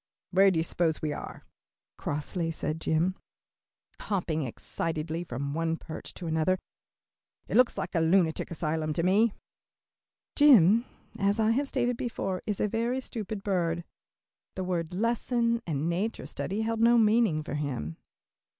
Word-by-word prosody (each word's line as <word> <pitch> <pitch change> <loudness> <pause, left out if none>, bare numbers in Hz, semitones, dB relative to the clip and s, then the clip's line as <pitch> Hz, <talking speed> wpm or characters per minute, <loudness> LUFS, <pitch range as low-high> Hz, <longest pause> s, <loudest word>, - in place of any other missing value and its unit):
"Where 195 +2 +6
do 185 - 0
you 160 - +2
suppose 165 -1 0
we 150 -1 -2
are?" - - -8 0.5
crossly 165 +3 -3
said 160 0 -3
Jim, 165 +4 +1 0.9
hopping 175 -6 -1
excitedly 160 +6 -3
from 140 -2 -4
one 165 +1 0
perch 160 - -8
to 180 - -7
another, 160 +3 +1 0.9
"it - - -3
looks 250 -1 +4
like - - -3
a 170 - +2
lunatic 165 0 +2
asylum 155 -1 -1
to 165 - -1
me." 205 +5 +3 1.0
Jim, 235 - +6 0.3
as 200 +2 +2
I 220 0 +3
have 275 +5 +1
stated 245 -3 0
before, 195 -6 -3
is 210 -2 -1
a - - +2
very 230 +4 0
stupid 215 -5 -5
bird. 175 -4 0 0.7
The 190 - -2
words 175 -2 -2
"lesson" 235 +1 +1
and 155 -1 -1
"nature 190 +7 -2
study" 200 +3 -3
held 225 0 -1
no 235 +1 +5
meaning 215 -8 +3
for 150 - -6
him. 130 - -3
180 Hz, 150 wpm, -29 LUFS, 160-225 Hz, 1.0 s, Where